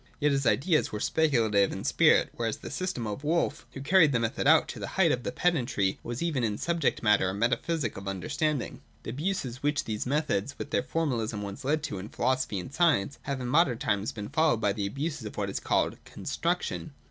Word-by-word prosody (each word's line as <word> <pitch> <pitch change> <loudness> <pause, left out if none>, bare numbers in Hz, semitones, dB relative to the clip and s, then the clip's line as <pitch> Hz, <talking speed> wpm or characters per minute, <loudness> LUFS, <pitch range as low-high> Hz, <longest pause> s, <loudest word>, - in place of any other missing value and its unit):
Yet 150 -1 +3
his 135 -2 +1
ideas 155 +6 +2
were 105 - -4
speculative 115 -10 +2
in - - -5
spirit; - - +4
whereas 115 -2 -2
the - - -9
system 180 -11 -3
of 105 +6 -5
Wolf, 165 +3 0
who 135 - -7
carried 165 -1 +5
the 120 - +2
method 115 +4 -1
out 160 +1 +6
to - - -6
the - - -4
height 175 -5 +5
of 125 - 0
pedantry, 125 - +1
was 120 +5 -4
even 150 -7 0
in 105 -2 0
subject 170 -4 0
matter 105 -3 +4
a 95 - -3
metaphysic 120 +4 0
of 100 - -8
the - - -2
understanding. 130 - -2 0.2
The - - -5
abuses 135 -4 -3
which 145 0 +1
these 110 +1 -3
methods 140 -4 -1
with - - -6
their - - +2
formalism 115 -10 -2
once 100 +7 -7
led 150 +3 0
to 100 - -4
in 100 +3 -7
philosophy 130 -6 0
and 110 +9 -8
science 145 - +2
have 140 -1 -1
in 125 - -3
modern 140 -2 +3
times 100 -2 -1
been 105 -1 -7
followed 155 -7 +2
by 100 -3 +1
the 100 -2 -2
abuses 140 +2 -4
of - - -10
what 100 -2 -1
is - - -3
called - - 0
'Construction.' - - -3
130 Hz, 215 wpm, -28 LUFS, 105-155 Hz, 0.2 s, out